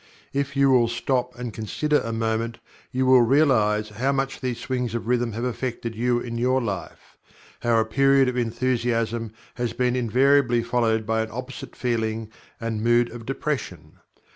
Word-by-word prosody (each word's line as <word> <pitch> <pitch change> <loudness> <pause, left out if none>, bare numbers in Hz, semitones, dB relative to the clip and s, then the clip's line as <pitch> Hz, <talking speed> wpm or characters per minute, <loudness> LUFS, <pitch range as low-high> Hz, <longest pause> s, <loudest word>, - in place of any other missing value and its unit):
If 140 0 -2
you 140 0 +4
will 120 -2 +5
stop 125 +1 -1
and 120 -2 -5
consider 150 +8 0
a 115 - -4
moment, 115 +1 -1 0.3
you 130 +1 0
will 130 -1 +7
realize 115 -5 +3
how 120 +6 -1
much 135 0 -2
these 125 -3 -2
swings 125 -3 -2
of 115 - -3
Rhythm 120 -1 0
have 115 +3 -4
affected 125 -2 -3
you 120 +2 +1
in 115 -1 -5
your 130 +2 +2
life 100 -7 -6 0.4
how 120 -1 +2
a 110 - +2
period 135 +3 +4
of 125 - -1
Enthusiasm 115 -2 -1 0.2
has 120 -1 -3
been 125 0 +1
invariably 125 0 +3
followed 115 -2 +1
by 110 +1 +1
an 110 - -3
opposite 125 +3 -7
feeling 110 -2 -2 0.3
and 115 -2 -3
mood 120 0 +3
of 115 -1 -9
Depression. 135 -1 -4
120 Hz, 165 wpm, -24 LUFS, 115-130 Hz, 0.4 s, will